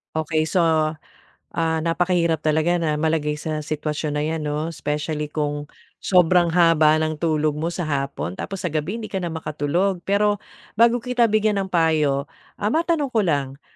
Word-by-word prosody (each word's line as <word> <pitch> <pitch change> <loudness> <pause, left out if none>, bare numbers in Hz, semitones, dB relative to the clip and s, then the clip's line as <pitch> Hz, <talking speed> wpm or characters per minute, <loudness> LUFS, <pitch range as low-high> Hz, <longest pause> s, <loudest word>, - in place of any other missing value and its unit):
Okey 155 0 0
so 175 +3 +1
ah, 155 -2 0 0.7
napakahirap 170 -1 +1
talaga 155 +3 +2
na 155 -2 0
malagay 150 -1 0
sa 155 0 -3
sitwasyon 150 0 -3
na 150 - 0
'yan 160 0 -2
'no? 150 +2 -3
Specially 150 +1 -3
kung 145 -1 -3 0.3
sobrang 180 -1 +4
haba 165 -2 +4
ng 155 -1 -4
tulog 155 -2 +1
mo 155 +3 -2
sa 175 0 -4
hapon 140 - -2
tapos 190 - -5
sa 170 - -2
gabi 160 +8 -2
hindi 225 - -6
ka 190 - -1
na 175 - -2
makatulog, 160 +4 -1
pero 205 +1 +1 0.3
bago 235 +2 +4
kita 245 -1 +1
bigyan 210 -1 +2
ng 190 - -5
payo, 155 -5 +2 0.3
ah, 210 +2 -1
matanong 320 -4 0
ko 225 - +3
lang, 140 -6 -1
160 Hz, 165 wpm, -22 LUFS, 150-180 Hz, 0.7 s, sobrang